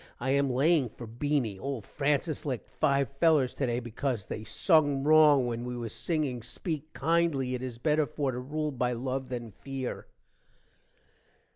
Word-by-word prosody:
i 130 +2 -1
am 140 0 +2
laying 140 +1 +3
for 120 - -10
Beany. 120 -3 -1
old 135 -5 -4
Francis 150 +2 -1
licked 130 -6 -3
5 140 -1 +1
fellers 155 -6 +4
today 120 -3 -1
becaus 120 -2 -3
they 110 - -5
sung 145 - +2
rong 150 -3 +6
when 120 -1 -3
we 125 0 -4
was 115 -2 -5
singing 150 -7 -1
speek 155 - -5
kindly 155 -4 +1
it 125 - -3
is 125 -3 -5
better 150 +4 +2
for 140 +2 -1
to 125 - -4
rule 150 +4 -2
by 125 -2 0
luv 130 +2 -3
than 120 -3 -5
feer. 135 +2 -6
135 Hz, 160 wpm, -29 LUFS, 125-150 Hz, -, rong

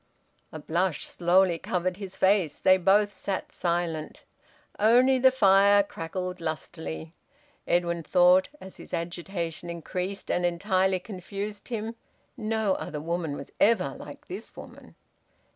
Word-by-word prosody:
A - - -7
blush 165 +1 -1
slowly 175 0 +2
covered 180 +1 -2
his 195 -2 -8
face. 190 -6 +2
They 185 0 +5
both 205 +3 +3
sat 190 0 -4
silent. 170 -3 -2 0.6
Only 250 +5 +5
the 260 +1 +7
fire 200 -4 +5
crackled 180 0 -5
lustily. 80 - -5 0.5
Edwin 170 -1 +1
thought, 180 +3 +4
as 190 - -11
his - - -6
agitation 170 0 -4
increased 180 +3 -4
and 180 - 0
entirely 185 +2 +1
confused 200 +2 -7
him, 225 -1 -4 0.4
"No 220 -4 0
other 150 - -5
woman 165 -1 -3
was 140 - -9
ever 230 +2 +3
like - - -11
this - - -8
woman!" - - -12
185 Hz, 125 wpm, -27 LUFS, 170-200 Hz, 0.6 s, the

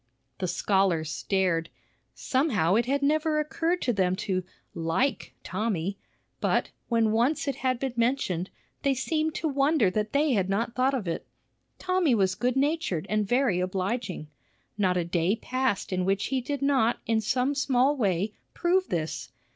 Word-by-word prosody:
The 185 - -1
scholars 175 -3 +1
stared. 180 0 0 0.5
Somehow 255 - +1
it 235 +3 +2
had 280 +2 0
never 305 +1 +2
occurred 330 +3 -1
to 245 - +1
them 185 -3 +1
to 185 -2 -2 0.3
"like 165 +12 -1
Tommy;" 195 -1 -2 0.4
but, - - +1 0.2
when 230 -2 +3
once 245 +8 +1
it 275 - -1
had 255 -1 0
been 265 -1 -2
mentioned, 230 -7 0 0.3
they 275 -1 +2
seemed 310 +4 -1
to 320 - -1
wonder 275 - +2
that 210 +2 -1
they 285 0 +2
had 195 -4 +1
not 225 +4 0
thought 260 +2 +2
of 220 -8 -3
it. 165 - -3 0.5
Tommy 365 -8 +2
was 190 -3 +2
good 245 +6 0
natured 280 - 0
and 215 -1 +1
very 245 -5 +2
obliging. 185 -1 -2 0.5
Not 185 -3 +1
a 175 - 0
day 170 +3 +1
passed 255 -5 -1
in 185 0 0
which 195 +2 +1
he 265 -1 0
did 280 +2 -3
not 265 -5 +3
in 225 -1 +1
some 250 +5 +1
small 275 0 +2
way 200 -4 0 0.2
prove 370 +2 +1
this. 155 -7 -3
230 Hz, 165 wpm, -27 LUFS, 185-275 Hz, 0.5 s, when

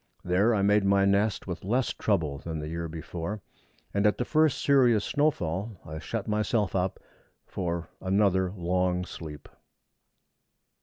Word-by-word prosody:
There 100 +6 +3
I 100 - +1
made 105 +1 +4
my 100 0 +4
nest 100 +1 +1
with 90 -2 -5
less 120 +5 0
trouble 80 -9 0
than 80 +2 -5
the 75 0 -5
year 85 0 -3
before, 85 +5 -5 0.5
and 100 +1 +3
at 105 - +2
the 120 - -1
first 155 -1 +3
serious 125 -7 +4
snowfall 105 - -1
I 80 0 -6
shut 110 +7 -4
myself 105 -1 0
up 95 0 -1 0.5
for 85 -2 -3
another 95 -1 +2
long 90 -1 0
sleep. 75 -4 -9
95 Hz, 145 wpm, -28 LUFS, 85-105 Hz, 0.5 s, made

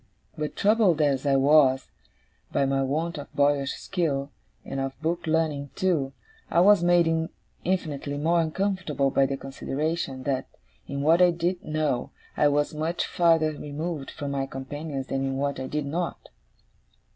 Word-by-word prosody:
But, 150 -1 -4
troubled 205 -6 +3
as 145 -2 +1
I 135 - +4
was, 135 -1 +4 0.6
by 140 - +2
my 135 0 +1
want 155 +4 -1
of 145 - -9
boyish 140 -1 +2
skill, 145 -7 -2 0.3
and 135 - -4
of 135 0 -4
book 165 +2 -2
learning 155 -3 0
too, 160 -8 +1 0.4
I - - +3
was 200 -1 +6
made 165 -2 +3 0.3
infinitely 150 -6 -2
more 165 +3 +2
uncomfortable 165 -5 0
by 135 0 +3
the 135 0 -3
consideration, 135 0 -3
that, 130 -1 -1 0.4
in 140 0 -3
what 165 +4 +5
I 180 - +7
did 175 +1 -1
know, 155 -5 -1 0.3
I 150 - +4
was 145 +1 +1
much 160 +3 -1
farther 165 -2 +3
removed 150 0 -5
from 145 -1 -5
my 135 -1 -1
companions 135 +1 -5
than 135 0 -2
in 135 0 -1
what 140 0 -1
I 130 - -4
did 150 +1 -2
not. 170 +5 -4
150 Hz, 155 wpm, -26 LUFS, 135-165 Hz, 0.6 s, I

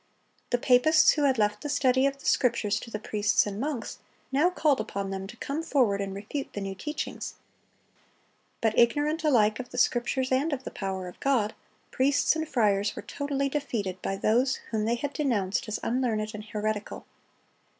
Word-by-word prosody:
The 245 - +2
papists 255 +6 +5
who 295 -2 +1
had 265 -2 +3
left 210 -1 +1
the 295 - -4
study 265 -2 +3
of 275 0 -3
the 275 - -15
Scriptures 220 -4 +2
to 230 - -9
the 215 - -3
priests 210 -1 +1
and 205 0 -5
monks, 275 -2 -4 0.3
now 290 +6 +4
called 305 -6 +2
upon 195 0 -3
them 190 0 -4
to 240 - -11
come 280 +6 -3
forward 240 -11 +2
and 195 -1 -4
refute 215 +8 -5
the - - -4
new 195 0 -3
teachings. 300 +10 -5 1.3
But, 220 -1 +1
ignorant 295 +7 +2
alike 225 -8 +3
of 250 - -6
the 250 - -9
Scriptures 250 +2 +1
and 280 +4 +2
of 265 -2 -4
the - - -6
power 190 -2 -4
of 180 - -11
God, 240 -6 +1 0.4
priests 280 +4 +2
and 315 -1 -3
friars 210 -3 +1
were - - -7
totally 280 -1 -2
defeated 225 -10 -3
by 195 - -2
those 245 +6 +2 0.2
whom 215 -2 0
they 235 +2 +1
had 285 +4 -4
denounced 215 - 0
as 215 - -3
unlearned 225 -4 0
and 210 0 -7
heretical. 215 -1 -3
240 Hz, 185 wpm, -27 LUFS, 210-275 Hz, 1.3 s, papists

